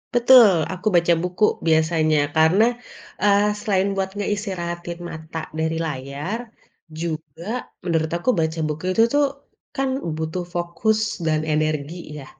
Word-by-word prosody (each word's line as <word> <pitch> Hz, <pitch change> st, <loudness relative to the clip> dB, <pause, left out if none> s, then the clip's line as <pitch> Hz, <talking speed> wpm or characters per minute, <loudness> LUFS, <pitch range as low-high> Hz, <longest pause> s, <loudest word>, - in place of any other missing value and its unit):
Betul, 240 Hz, -2 st, +8 dB, 0.2 s
aku 185 Hz, +3 st, -5 dB
baca 170 Hz, 0 st, +4 dB
buku 180 Hz, +3 st, -2 dB, 0.2 s
biasanya 160 Hz, -1 st, +3 dB, 0.2 s
karena, 160 Hz, +7 st, +5 dB, 0.6 s
eee, 205 Hz, +1 st, +4 dB
selain 195 Hz, -2 st, +1 dB
buat 190 Hz, 0 st, 0 dB
ngeistirahatin 180 Hz, -4 st, -4 dB
mata 160 Hz, 0 st, -7 dB, 0.2 s
dari 160 Hz, 0 st, 0 dB
layar, 145 Hz, -, -4 dB, 0.6 s
juga 160 Hz, -2 st, -5 dB, 0.4 s
menurut 160 Hz, -2 st, 0 dB
aku 175 Hz, -, -2 dB
baca 160 Hz, 0 st, -1 dB
buku 155 Hz, +2 st, -5 dB
itu 225 Hz, -, +4 dB
tuh 290 Hz, 0 st, +4 dB, 0.5 s
kan 270 Hz, 0 st, 0 dB, 0.3 s
butuh 160 Hz, +3 st, -3 dB
fokus 175 Hz, +6 st, 0 dB, 0.3 s
dan 155 Hz, -1 st, +1 dB
energi 155 Hz, 0 st, -1 dB, 0.3 s
ya? -, -, -10 dB
170 Hz, 125 wpm, -22 LUFS, 160-200 Hz, 0.6 s, Betul